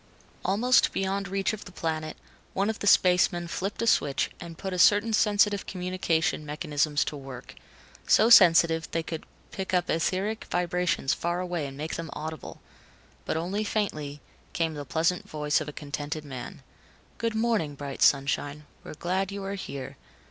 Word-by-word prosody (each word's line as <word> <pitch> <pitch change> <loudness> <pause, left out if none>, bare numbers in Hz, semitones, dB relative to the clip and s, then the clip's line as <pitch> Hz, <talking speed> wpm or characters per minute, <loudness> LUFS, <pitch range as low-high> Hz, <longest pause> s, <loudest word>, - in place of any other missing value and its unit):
Almost 240 +7 +3
beyond 195 +1 -1
reach 195 +2 -1
of 215 - -7
the - - -10
planet, 155 -2 -3 0.4
one 200 +3 +1
of 220 - -9
the 205 - -2
spacemen 180 -2 +4
flipped 195 +6 -3
a - - +1
switch 140 -11 +2
and 170 -2 -9
put 190 0 -4
certain 210 +4 +5
sensitive 205 -2 +3
communication 180 -4 -1
mechanisms 150 -1 0
to - - -4
work. 135 -3 -9 0.5
So 220 +3 +5
sensitive, 165 -5 +6
they 165 - -2
could 160 -1 -6 0.2
pick 190 -1 -3
up 180 0 +1
etheric 190 +7 -1
vibrations 175 -4 0
far 175 +1 -2
away 175 -5 -2
and 135 0 -9
make 155 +2 -4
them 165 -2 -5
audible. 155 -1 -7 0.6
But - - -1
only 185 +6 -2
faintly, 155 -9 -2 0.3
came 165 -1 0
the 145 -1 -6
pleasant 165 +5 0
voice 150 0 0
of 155 - -5
a - - -5
contented 145 +1 -5
man: 130 -3 -8 0.6
"Good 230 -1 -1
morning, 220 -10 0
bright 140 -1 -7
sunshine, 145 +1 +2 0.2
We're - - -9
glad 185 +4 -1
you 200 0 -5
are 195 +1 -3
here. 140 -9 -6
170 Hz, 165 wpm, -27 LUFS, 150-195 Hz, 0.6 s, sensitive